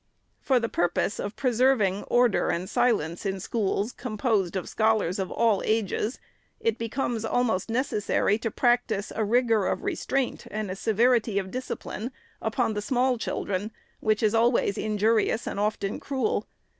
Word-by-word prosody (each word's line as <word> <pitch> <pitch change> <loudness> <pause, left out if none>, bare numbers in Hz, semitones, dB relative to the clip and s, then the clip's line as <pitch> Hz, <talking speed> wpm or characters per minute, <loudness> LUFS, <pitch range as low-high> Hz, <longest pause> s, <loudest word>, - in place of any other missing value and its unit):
For 260 -2 +2
the 230 - -1
purpose 175 +2 0
of 205 +1 -4
preserving 240 -6 +2
order 245 -3 +3
and 175 +2 -1
silence 175 -10 +1
in 195 -1 -2
schools, 205 +2 -1
com 235 -4 -6
posed 205 -6 +1
of 190 - -3
scholars 215 -4 +1
of 190 - -2
all 225 -4 +2
ages, 220 +2 0 0.4
it 230 0 0
becomes 230 0 -2
almost 225 -4 0
necessary 225 -3 +1
to 225 - -2
practise 240 -3 +1
a 220 - 0
rigor 225 -2 +2
of - - -1
restraint 315 -8 -1
and 210 -2 -3
a - - -3
severity 225 +1 +2
of 190 -1 -2
discipline 250 -2 -5 0.3
upon 220 +1 0
the 210 - -2
small 250 +1 +1
children, 200 -1 -2 0.3
which 215 0 +1
is 215 0 +3
always 230 -3 +3
injurious 215 +1 +1
and - - -4
often 205 -1 -1
cruel. 280 - -1
220 Hz, 155 wpm, -26 LUFS, 200-240 Hz, 0.4 s, order